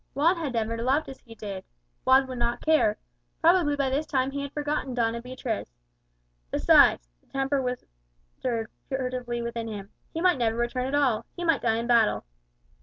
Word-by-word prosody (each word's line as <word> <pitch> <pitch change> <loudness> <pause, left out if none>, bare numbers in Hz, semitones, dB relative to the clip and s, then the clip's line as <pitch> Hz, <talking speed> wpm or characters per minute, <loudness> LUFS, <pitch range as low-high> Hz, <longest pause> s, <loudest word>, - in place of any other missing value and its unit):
Juan 325 +6 +4
had 305 -6 -3
never 230 0 -1
loved 270 +6 +1
as 265 - -9
he 230 -2 -14
did; 200 -3 -6 0.4
Juan 265 +1 +6
would 255 -2 -6
not 235 0 -1
care; 310 -10 +3 0.4
probably 330 -3 +4
by 275 -2 0
this 290 +3 -1
time 265 -1 0
he 280 0 -3
had 280 0 -5
forgotten 290 -3 -2
Doña 235 -1 0
Beatriz. 245 - -5 0.7
"Besides," - - +5
the - - -34
tempter 270 0 0
whispered 220 - -5 0.2
furtively 250 -3 -2
within 235 -1 -4
him, 205 -2 -7 0.2
"he 325 - -4
might 355 -5 +3
never 225 -1 +1
return 245 +2 -1
at 275 - -1
all; 265 -7 +2
he 350 - -5
might 325 -4 +2
die 225 -1 +2
in 230 - -2
battle." 235 -3 +3
250 Hz, 180 wpm, -27 LUFS, 230-280 Hz, 0.7 s, Juan